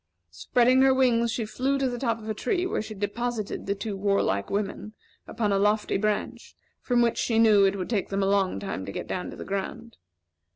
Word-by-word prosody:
Spreading 245 - +3
her 265 0 +5
wings 235 -3 +3
she 225 -1 -2
flew 265 +6 -1
to 270 -1 0
the 245 -1 -4
top 230 -3 0
of 220 -1 -11
a 215 - -1
tree 360 - -1
where 370 - -1
she 215 0 -8
deposited 215 +2 -3
the 200 - 0
two 205 0 -4
warlike 195 - 0
women 205 +1 -3 0.3
upon 210 -3 -1
a 195 - +2
lofty 210 +1 +1
branch, 210 +1 -2 0.3
from 245 -1 +2
which 235 - 0
she 225 - 0
knew 215 -3 +6
it 195 0 +2
would 185 +2 -5
take 205 -5 -1
them 195 0 0
a - - +2
long 195 - +1
time 95 -1 -5
to - - -4
get - - -5
down 180 - -4
to - - -8
the - - -7
ground. 200 +4 -5
215 Hz, 220 wpm, -26 LUFS, 195-235 Hz, 0.3 s, knew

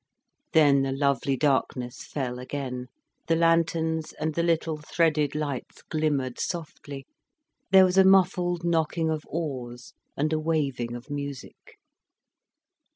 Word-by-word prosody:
Then 145 -3 +5
the 135 0 -1
lovely 135 -1 +1
darkness 130 -3 0
fell 125 -4 -3
again, 125 -1 -5 0.4
the 165 - +3
lanterns 165 -1 +1
and 155 0 -3
the 170 - 0
little 165 -2 0
threaded 150 -1 +1
lights 145 -4 -4
glimmered 145 -5 -1
softly, 150 -5 -5 0.6
there 190 -1 +8
was 185 +1 +3
a - - +8
muffled 180 -2 +3
knocking 160 -1 +1
of 155 -1 -2
oars 130 -7 -5 0.2
and 155 +3 0
a 155 - +1
waving 140 -7 -1
of 120 +5 -10
music. 140 -2 -7
150 Hz, 125 wpm, -26 LUFS, 135-165 Hz, 0.6 s, there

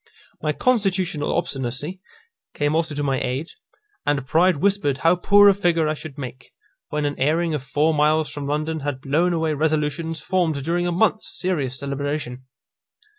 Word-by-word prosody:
My 155 - 0
constitutional 185 -7 0
obstinacy 145 +2 -3 0.5
came 145 0 0
also 160 -2 0
to 145 - -2
my 135 -2 0
aid, 130 +6 -3 0.5
and 145 -2 0
pride 170 +4 +3
whispered 160 -6 +1
how 165 +2 +6
poor 205 +3 +6
a 200 - +7
figure 175 -5 +1
I 155 - +1
should 155 -2 -9
make, 130 -2 -8 0.4
when 150 0 -1
an 145 0 -3
airing 160 +4 +1
of 150 - -2
four 150 +4 +1
miles 155 +1 +2
from 145 -1 -5
London 155 +2 -1
had 145 -2 -3
blown 155 +7 +1
away 160 -2 0
resolutions 155 +1 -1
formed 160 -3 0
during 175 +3 0
a - - 0
month's 215 +4 +1
serious 145 -9 -2
deliberation. 140 -2 -4
155 Hz, 165 wpm, -22 LUFS, 145-170 Hz, 0.5 s, a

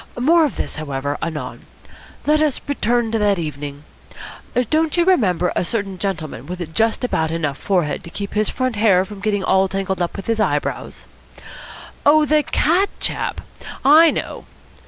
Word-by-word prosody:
More 320 +6 +4
of 290 - -3
this, - - -4
however, 145 -1 -3
anon. 150 -6 -5 0.6
Let 305 +1 +3
us 300 -4 +1
return 240 -4 0
to 225 - 0
that 205 -2 +2
evening. 145 -3 -5 0.9
Don't 315 +1 +1
you 345 - +3
remember 185 - +2
a - - +1
certain 195 -1 -3
gentleman 170 -7 -4
with 175 -2 -6
just 225 +4 +1
about 160 -10 0
enough 155 -4 -2
forehead 175 -7 0
to - - -8
keep 200 +3 -6
his 215 0 +1
front 255 -3 -2
hair 195 -4 +4
from 205 +1 -10
getting 205 -1 -1
all 190 0 +3
tangled 190 -1 -3
up 175 - -2
with 195 - -6
his 230 -1 -1
eye 185 -9 +2
brows?" - - -5 1.0
"Oh, 300 +1 +5
the 305 0 +3
cat 350 +7 +1
chap? - - -2 0.4
I 315 +4 +8
know." - - -4
200 Hz, 170 wpm, -20 LUFS, 170-260 Hz, 1.0 s, I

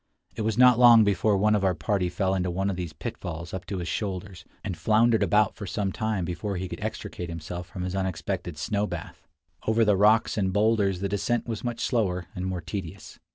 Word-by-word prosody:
It 115 - -4
was 110 0 -1
not 125 -1 +6
long 120 -2 +8
before 100 0 +2
one 105 +2 +3
of 105 -2 +1
our 95 -2 +2
party 90 +4 0
fell 95 +1 0
into 90 -1 0
one 95 +3 -1
of - - -3
these 90 -3 -4
pitfalls 85 +2 -6
up 95 - -6
to 100 - -3
his 85 -2 -4
shoulders, 95 -2 -4 0.2
and 95 -4 -3
floundered 110 +6 +3
about 105 -1 +3
for 100 - -7
some 95 +1 -1
time 110 -3 -2
before 90 +3 -3
he 95 +1 -3
could - - -7
extricate 105 -4 -5
himself 85 +1 -6
from 90 - -6
his 90 +1 -3
unexpected 95 -2 -3
snow 105 +6 -1
bath. - - -8 0.4
Over 110 +1 +3
the 105 -1 +4
rocks 105 +2 +3
and 95 -2 +1
boulders 100 -2 +2
the 100 - 0
descent 100 +4 -1
was 115 -3 -4
much 120 -1 -3
slower 95 -7 0
and 90 +1 -4
more 90 -1 -3
tedious. 95 -3 -7
95 Hz, 215 wpm, -26 LUFS, 90-110 Hz, 0.4 s, long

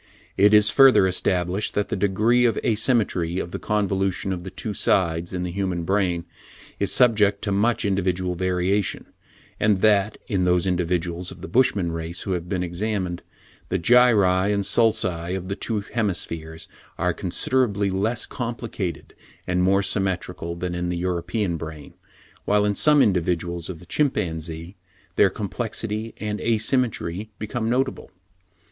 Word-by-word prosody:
It 100 +2 +5
is 105 0 +5
further 135 -6 +6
established, 90 +1 0
that 105 - 0
the - - -1
degree 105 +5 +2
of 115 -3 +2
asymmetry 105 -7 +1
of 85 - -4
the - - -5
convolution 95 -2 -1
of 90 -1 -6
the 95 - -6
two 105 +3 -4
sides 85 -3 +1
in 90 -1 -3
the 90 - -3
human 95 -2 -2
brain 90 -2 0 0.5
is - - +2
subject 105 -5 +4
to 100 - -1
much 110 +3 +1
individual 95 -2 0
variation; 95 +2 0 0.5
and 105 -3 +2
that, 105 -1 +3
in 95 -3 0
those 90 0 +2
individuals 90 -1 -1
of 90 - -11
the 95 - -6
Bushman 105 -9 +2
race 85 +1 -4
who 95 - -4
have 90 -1 -3
been 95 -2 -1
examined, 90 0 -3 0.5
the 95 - 0
gyri 100 -2 +4
and 100 -1 0
sulci 95 -5 +1
of 90 0 -7
the 100 - -2
two 110 0 -2
hemispheres 85 -7 -3 0.3
are 90 0 0
considerably 100 +2 0
less 110 +5 -1
complicated 115 -7 -5 0.3
and 90 0 0
more 95 +2 +3
symmetrical 90 -4 -2
than 90 +1 -4
in 90 0 -2
the 90 - -2
European 90 +1 -2
brain, 80 -3 -9 0.5
while, 105 0 +2
in 105 - +1
some 150 +6 +4
individuals 85 -2 -1
of 90 - -6
the 90 - -15
chimpanzee, 85 - -2 0.4
their - - +5
complexity 110 +1 -4
and 105 0 -3
asymmetry 110 -4 0
become 110 +1 -3
notable. 130 +2 -1
95 Hz, 150 wpm, -23 LUFS, 90-105 Hz, 0.5 s, further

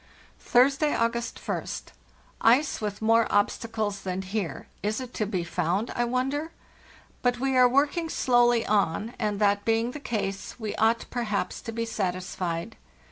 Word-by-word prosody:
"Thursday, 275 +4 +3
August 235 +1 -1
ist. - - -4 0.5
Ice 250 +5 +4
with 210 0 -4
more 225 +1 +4
obstacles 205 0 0
than 185 0 -3
here—is 205 - -3
it 255 -1 -7
to 215 - -1
be 185 -4 -1
found, 180 +6 -1
I 240 - +1
wonder? 270 +6 -1 0.7
But 245 -1 +1
we 265 0 0
are 250 -1 +6
working 290 +5 +1
slowly 240 -4 +3
on, 205 +2 +1
and, 210 -1 -1
that 205 -1 +3
being 225 +2 +1
the 295 - -7
case, 200 -5 -4
we 215 -2 -3
ought, 225 +1 +2
perhaps, 225 -5 -2
to 230 - -6
be 230 +1 -2
satisfied. 185 -2 -3
225 Hz, 145 wpm, -27 LUFS, 205-245 Hz, 0.7 s, are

